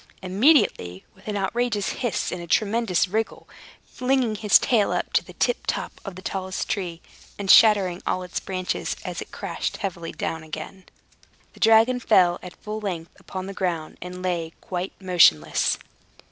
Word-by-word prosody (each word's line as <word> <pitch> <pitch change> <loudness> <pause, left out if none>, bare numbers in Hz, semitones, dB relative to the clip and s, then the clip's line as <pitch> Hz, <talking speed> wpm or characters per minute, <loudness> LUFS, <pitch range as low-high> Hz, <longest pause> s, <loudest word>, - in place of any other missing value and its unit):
Immediately, 185 - +2
with 190 - -20
an 210 -1 -2
outrageous 210 +1 -1
hiss 240 -7 -2
and 180 - -4
a 170 - -8
tremendous 210 -1 +2
wriggle 220 +4 -3 0.4
flinging 255 -3 0
his 210 -1 +5
tail 220 -5 +2
up - - -2
to - - +3
the - - -13
tip - - -1
top - - -3
of 195 -3 -7
the 185 - -10
tallest 190 -1 -3
tree, 175 -5 -3 0.3
and 200 -2 +2
shattering 195 -5 +6
all 185 - 0
its 180 - -4
branches 185 -1 -3
as - - -4
it - - -8
crashed - - -4
heavily 170 -5 -4
down 160 - -4
again 170 +4 -8 0.7
the - - -17
dragon 225 +2 +5
fell 180 -7 +4
at 180 - -10
full 215 0 -4
length 175 -6 -4
upon 185 -1 -6
the 195 - -6
ground, 170 -5 -3
and 180 +1 -7
lay 170 -3 -2
quite 180 +1 -4
motionless. 170 - +4
190 Hz, 165 wpm, -24 LUFS, 175-215 Hz, 0.7 s, shattering